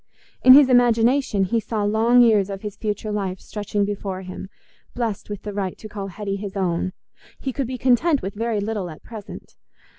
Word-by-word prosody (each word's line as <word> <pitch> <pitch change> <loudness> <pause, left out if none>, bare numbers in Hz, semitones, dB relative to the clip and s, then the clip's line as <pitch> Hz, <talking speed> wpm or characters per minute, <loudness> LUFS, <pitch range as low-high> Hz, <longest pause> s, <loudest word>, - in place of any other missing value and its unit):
In 255 - +10
his 285 -1 +8
imagination 245 -2 +3
he 225 +5 +1
saw 215 0 -3
long 225 +4 +4
years 210 -4 +3
of 195 0 -6
his 210 -1 -5
future 210 0 -3
life 190 -3 -3
stretching 205 -1 -2
before 195 -2 -4
him, 185 +1 -8 0.5
blest 225 -5 -3
with 205 -1 -6
the 210 - -5
right 195 -2 -3
to 215 - -9
call 205 -2 -6
Hetty 200 +1 -4
his 200 0 -6
own: 185 -1 -1 0.5
he 265 - -4
could 270 -2 -2
be 255 0 -4
content 265 +5 +2
with 195 - -4
very 225 0 -1
little 205 -3 -3
at 155 - -12
present. 220 -4 -10
210 Hz, 190 wpm, -22 LUFS, 195-235 Hz, 0.5 s, In